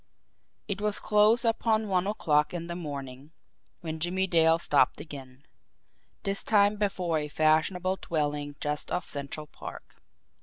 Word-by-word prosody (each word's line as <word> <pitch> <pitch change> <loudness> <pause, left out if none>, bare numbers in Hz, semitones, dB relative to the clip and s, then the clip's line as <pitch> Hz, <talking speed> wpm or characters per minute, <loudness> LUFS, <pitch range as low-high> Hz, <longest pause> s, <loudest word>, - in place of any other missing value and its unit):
It 200 -1 -3
was 210 -1 +4
close 215 +3 +3
upon 225 -1 +1
one 185 -1 +1
o'clock 150 -6 +1
in 170 -1 -4
the 170 0 -5
morning 140 -3 -7 0.5
when 160 -1 -5
Jimmie 180 +3 0
Dale 165 -2 +4
stopped 145 -5 +2
again 140 -2 -10 0.8
this 200 -1 0
time 205 -1 +3
before 185 -6 0
a 150 - -4
fashionable 160 +5 +1
dwelling 145 -3 -2
just 150 0 -3
off 180 - -2
Central 140 +2 -4
Park. - - -11
165 Hz, 140 wpm, -28 LUFS, 150-195 Hz, 0.8 s, was